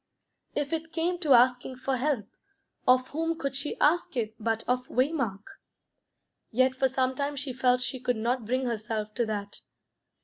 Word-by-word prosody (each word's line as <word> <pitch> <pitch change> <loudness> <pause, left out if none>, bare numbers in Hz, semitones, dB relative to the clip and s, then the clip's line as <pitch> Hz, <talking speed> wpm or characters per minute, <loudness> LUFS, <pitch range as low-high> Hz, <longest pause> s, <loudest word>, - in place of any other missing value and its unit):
If 290 +1 -1
it 325 0 -3
came 345 +2 0
to 305 -6 +4
asking 250 +1 +4
for 260 +1 -1
help, 260 -5 0 0.6
of 255 0 +4
whom 325 +2 -1
could 275 -2 -3
she 280 +2 -1
ask 315 -3 +2
it 220 -2 -1
but 225 0 -1
of 250 0 0
Waymark? 255 -7 0 1.1
Yet 255 +3 +3
for 265 +1 +2
some 260 0 0
time 280 +2 -2
she 275 -1 -3
felt 250 0 +2
she 260 +1 -2
could 245 -1 0
not 235 0 -1
bring 255 +2 0
herself 215 -2 -3
to 235 0 0
that. 205 -1 -4
255 Hz, 170 wpm, -28 LUFS, 235-280 Hz, 1.1 s, to